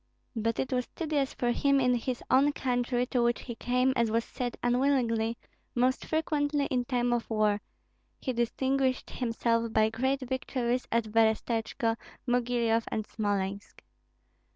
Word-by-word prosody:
But 230 0 0
it 265 - -1
was 250 -1 0
tedious 295 -5 -1
for 240 -1 +1
him 275 +3 +3
in 250 -1 +3
his 245 +1 -2
own 280 +3 +5
country, 245 -1 0
to 250 0 0
which 240 0 +1
he 240 - -6
came, 250 +3 +1
as 235 -2 +2
was 230 +1 +1
said, 245 -2 -4
unwillingly, 240 -3 +2 0.4
most 255 +2 +1
frequently 295 -2 0
in 250 -1 +1
time 245 -1 +1
of 240 -1 -2
war; 210 -2 +2 0.6
he 255 - -2
distinguished 260 +2 0
himself 230 -1 0
by 220 0 +3
great 265 +4 0
victories 255 -1 -2
at 230 -2 0
Berestechko, 225 +1 +1 0.3
Mogilyoff, 240 -2 +1
and 215 - -2
Smolensk. 200 -2 -3
245 Hz, 145 wpm, -29 LUFS, 230-260 Hz, 0.6 s, own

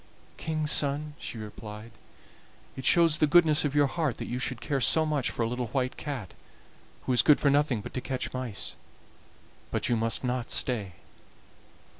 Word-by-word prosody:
"King's 155 -1 0
son," 145 +1 +1
she - - -6
replied, 105 +1 -9 0.8
"it 130 - -7
shows 165 -1 +5
the 155 - +4
goodness 160 -1 +5
of 145 -1 -1
your 145 -1 +5
heart 150 -3 -1
that - - -5
you 125 - -4
should 125 -1 -2
care 140 0 -2
so 160 +7 +3
much 150 -5 0
for 115 - -2
a - - 0
little 125 +1 -3
white 130 +1 -2
cat, 135 - -6 0.7
who 130 - 0
is 125 - +6
good 150 - +5
for 140 - +3
nothing 140 -6 +2
but - - -9
to 130 - -3
catch 130 -1 -3
mice; 125 -5 -5 0.9
but - - -1
you 120 - +3
must 115 +2 0
not 125 -1 -2
stay." 105 -8 -1
130 Hz, 180 wpm, -28 LUFS, 120-150 Hz, 0.9 s, is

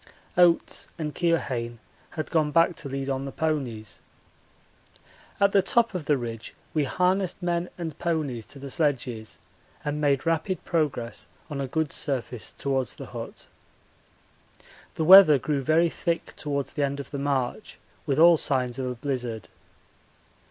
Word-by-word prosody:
Oates 175 -2 +3
and 150 -3 -3
Keohane 130 -9 -1 0.4
had 155 - -3
gone 155 -3 +2
back 165 +3 +3
to 140 - -6
lead 135 0 -3
on 135 0 -2
the 135 - -5
ponies. 135 - -3 1.4
At 200 0 +4
the 195 - +5
top 230 +4 +2
of 180 -5 -4
the 145 -1 +3
ridge 115 -2 -6 0.2
we 150 -2 +1
harnessed 180 +4 0
men 175 0 0
and 165 -4 -5
ponies 150 -9 -2
to - - -9
the 140 0 -8
sledges 125 -8 -1 0.5
and 150 0 -2
made 140 -1 +2
rapid 165 +3 -1
progress 145 -8 -1 0.2
on 140 -1 -3
a 135 - -2
good 160 +2 -1
surface 125 -4 -3
towards 135 -3 -2
the - - -8
hut. - - -8 1.5
The 160 - -1
weather 185 -4 +10
grew 140 +2 -1
very 160 +5 +3
thick 170 -1 -3
towards 140 -2 -3
the 145 - -2
end 140 0 -1
of 140 - -8
the 140 - -4
march, 140 - -2 0.3
with 140 -2 +1
all 170 +1 +7
signs 130 -4 -1
of 130 - -2
a 125 - -3
blizzard. 120 -4 -4
145 Hz, 155 wpm, -26 LUFS, 130-165 Hz, 1.5 s, weather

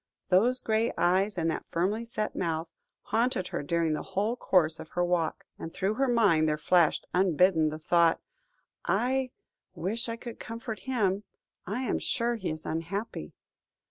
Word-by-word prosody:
Those 235 +8 +4
grey 220 +1 +1
eyes 190 +3 +2
and 165 -1 +1
that - - -5
firmly 200 +7 0
set 215 -2 -3
mouth, 165 -1 -1 0.4
haunted 225 -5 0
her - - -3
during 165 +2 0
the 150 - -2
whole 205 +4 -1
course 165 -9 +2
of 160 - -9
her 175 0 0
walk, 175 -2 -1
and 165 - -6
through 195 +4 -1
her 270 +4 +1
mind 200 -10 +4
there 150 - 0
flashed 165 +1 +3
unbidden 180 -3 +3
the 155 - -5
thought 165 +1 +3 0.6
"I 260 +1 +1 0.5
wish 215 +8 -2
I 230 - -2
could 235 0 -9
comfort 230 -1 -6
him. 205 -5 +1 0.4
I 210 +7 -2
am - - 0
sure 235 0 0
he 220 -6 -3
is 155 0 -5
unhappy." 165 - -4
190 Hz, 165 wpm, -29 LUFS, 165-230 Hz, 0.6 s, Those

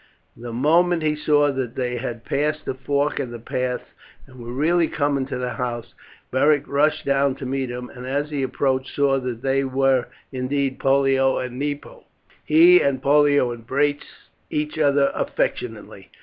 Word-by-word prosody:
The 120 0 -8
moment 165 +7 +2
he 155 -1 +1
saw 145 -1 +2
that 130 -3 -4
they 125 -1 -2
had 120 -2 -5
passed 150 +2 -1
the - - -2
fork 140 +2 -1
of 125 - -3
the 120 - -7
paths 125 +2 -3 0.4
and 130 -1 -16
were 120 0 -7
really 160 +6 +2
coming 140 -3 -1
to 135 -2 -4
the 125 0 -3
house 120 -2 -4 0.4
Beric 145 +2 +2
rushed 150 +2 +1
down 140 -1 +2
to 135 - -8
meet 135 0 -2
them, 125 0 -7
and 125 0 -9
as 145 +3 -2
he 145 -2 -2
approached 130 0 -1
saw 140 -1 +2
that 125 -2 -5
they 135 0 +1
were 135 -1 +1 0.2
indeed 135 +1 -2
Pollio 135 -1 +2
and 125 0 -5
Nepo. 145 0 -5 0.4
He 170 +4 +6
and 140 -2 +1
Pollio 145 -2 +3
embraced 140 +5 -1 0.4
each 150 +1 -3
other 140 -2 +3
affectionately. - - -3
135 Hz, 165 wpm, -22 LUFS, 130-145 Hz, 0.4 s, He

